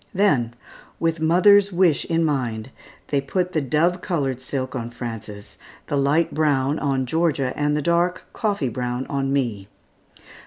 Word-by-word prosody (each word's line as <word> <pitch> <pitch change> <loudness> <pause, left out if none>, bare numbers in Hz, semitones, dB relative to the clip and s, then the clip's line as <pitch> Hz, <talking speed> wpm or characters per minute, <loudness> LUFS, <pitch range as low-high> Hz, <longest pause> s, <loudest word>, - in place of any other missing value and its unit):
Then, 135 - +2 0.4
with 165 0 0
mother's 195 +5 +5
wish 175 -4 +2
in 165 0 +1
mind, 125 -5 -2 0.4
they 140 -1 +1
put 180 +6 -2
the 155 - +1
dove 165 +6 +1
colored 135 -9 -2
silk 130 0 -4
on 120 -2 -4
Frances, 110 -4 -8 0.3
the - - -2
light 145 +4 +2
brown 145 -1 +1
on 135 -2 0
Georgia, 145 -2 0
and 150 0 +1
the 150 - -2
dark 170 +2 +1
coffee 200 - -1
brown 125 +2 -3
on 135 -1 -1
me. 115 -8 -1
140 Hz, 150 wpm, -22 LUFS, 130-170 Hz, 0.4 s, mother's